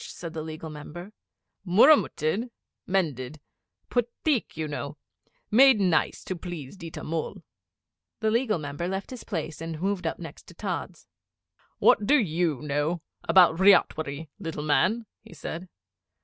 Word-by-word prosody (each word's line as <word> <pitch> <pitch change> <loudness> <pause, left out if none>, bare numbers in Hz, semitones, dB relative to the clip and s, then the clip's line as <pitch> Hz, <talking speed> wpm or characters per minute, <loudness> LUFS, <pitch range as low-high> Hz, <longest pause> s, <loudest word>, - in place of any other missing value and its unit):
said 165 -2 -8
the 160 - -4
Legal 155 0 -7
Member. 175 +6 -9 0.5
'Murramutted 210 - +4 0.4
mended. 155 -7 -1 0.5
Put 245 -1 +1 0.2
theek, 280 - +1
you 160 -1 -2
know 145 0 -5 0.5
made 260 +1 +7
nice 180 -5 +1
to 185 - -4
please 170 -4 -7
Ditta 165 -4 -8
Mull!' 165 +3 -4 0.8
The 220 -1 +1
Legal 230 -3 +2
Member 145 +2 -4
left 190 +4 -4
his 255 - -7
place 165 -5 -4
and 165 -1 -5
moved 190 -1 -1
up - - -2
next 165 -4 -10
to - - -14
Tods. - - -5 0.7
'What 205 - +4
do 295 - +6
you 165 - 0
know 150 +3 -1 0.2
about 175 -3 +6
ryotwari, 160 -6 +3
little 160 -2 -5
man?' 185 - +2 0.2
he - - -14
said. 170 +4 -6
170 Hz, 140 wpm, -27 LUFS, 155-200 Hz, 0.8 s, made